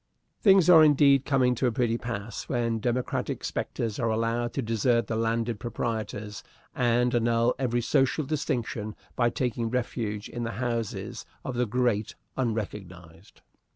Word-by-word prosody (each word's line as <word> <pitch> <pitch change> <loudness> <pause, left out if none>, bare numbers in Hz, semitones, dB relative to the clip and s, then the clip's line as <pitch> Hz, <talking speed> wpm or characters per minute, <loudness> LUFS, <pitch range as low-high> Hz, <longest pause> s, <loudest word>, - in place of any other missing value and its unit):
Things 195 -4 +6
are 165 -3 +9
indeed 140 -2 +5
coming 130 -3 +3
to 125 +2 0
a - - +1
pretty 115 0 0
pass 115 -2 -5
when 115 -3 0
democratic 125 +2 -2
spectres 115 -3 -3
are 115 - +1
allowed 115 +2 0
to 135 - -2
desert 115 +1 +1
the 110 - -3
landed 115 0 -1
proprietors 110 -3 -4 0.3
and 120 0 +2
annul 115 0 +2
every 120 -2 0
social 135 +4 +1
distinction 120 -7 -2 0.2
by 120 -1 +3
taking 120 -1 -2
refuge 110 -4 -3
in 120 - -6
the 115 0 -3
houses 115 -3 -3 0.2
of 130 - -3
the 120 0 0
great 115 -2 0 0.2
unrecognized. 95 -7 -5
120 Hz, 145 wpm, -27 LUFS, 110-125 Hz, 0.3 s, are